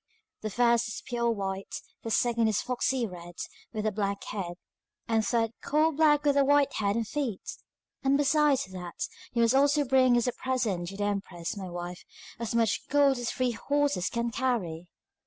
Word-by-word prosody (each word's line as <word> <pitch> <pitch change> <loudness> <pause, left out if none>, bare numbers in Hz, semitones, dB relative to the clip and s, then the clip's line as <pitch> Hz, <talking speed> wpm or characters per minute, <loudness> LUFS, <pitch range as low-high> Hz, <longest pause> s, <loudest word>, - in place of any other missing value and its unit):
The 215 - -3
first 235 +2 +3
is 225 - -6
pure 235 -1 0
white, 195 -3 -3 0.3
the 225 - -5
second 230 0 +2
a 220 - +1
foxy 250 +3 0
red 175 -3 -9 0.4
with 215 -2 -3
a 215 - +2
black 200 -1 -2
head, 175 -4 -4 0.5
the 225 -1 +2
third 225 +1 +1
coal 310 +2 +2
black 295 -1 +4
with 285 -1 +3
a 280 - +6
white 285 0 +3
head 200 -1 0
and 230 -2 -1
feet. 250 -7 -3 0.5
And 275 +1 +3
besides 290 -1 +3
that, 180 -2 -6 0.3
you 235 -1 +3
must 230 +1 +4
also 285 +2 +4
bring 255 -1 +4
as 240 - +1
a - - +2
present 235 -10 -1
to 195 +2 -7
the 205 - -1
empress, 195 -4 -3
my 190 -2 -6
wife, 175 0 -6 0.4
as 235 0 -3
much 225 -4 +1
gold 280 -2 +4
as 245 - -4
the - - -5
three 255 -1 +1
horses 285 -4 0
can 235 0 -2
carry. 205 -10 -1
235 Hz, 190 wpm, -29 LUFS, 200-265 Hz, 0.5 s, a